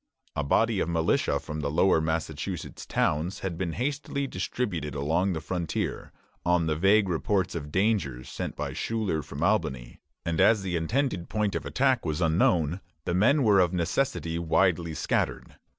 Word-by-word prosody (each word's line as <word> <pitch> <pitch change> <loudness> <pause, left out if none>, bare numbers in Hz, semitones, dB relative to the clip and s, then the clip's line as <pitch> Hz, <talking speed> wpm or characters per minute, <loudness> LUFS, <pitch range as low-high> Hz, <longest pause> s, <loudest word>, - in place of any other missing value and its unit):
A 75 - 0
body 110 +8 +2
of 85 - 0
militia 85 -1 +1
from 75 0 -6
the 75 -1 -1
lower 80 +2 +3
Massachusetts 80 0 -3
towns 80 +6 0
had 95 -3 -3
been 85 -1 -3
hastily 140 - -2
distributed 90 - -3
along 85 +7 +1
the 80 - -2
frontier, 85 -2 -3 0.3
on 90 -1 +2
the 80 -1 0
vague 100 +5 +4
reports 95 +2 0
of 75 -3 -5
danger 95 - +1
sent - - -5
by - - -4
Schuyler 105 -9 -1
from - - -6
Albany; - - 0 0.3
and 85 +1 +1
as 100 +1 +5
the 90 -2 -2
intended 90 - -1
point 105 -2 0
of - - -3
attack 130 -2 +2
was 80 -1 -2
unknown, 85 0 +2 0.2
the 85 - -1
men 120 +11 +4
were 105 -4 +5
of 90 -1 +3
necessity 85 - -1
widely 85 0 +1
scattered. - - -1
90 Hz, 165 wpm, -27 LUFS, 80-105 Hz, 0.3 s, as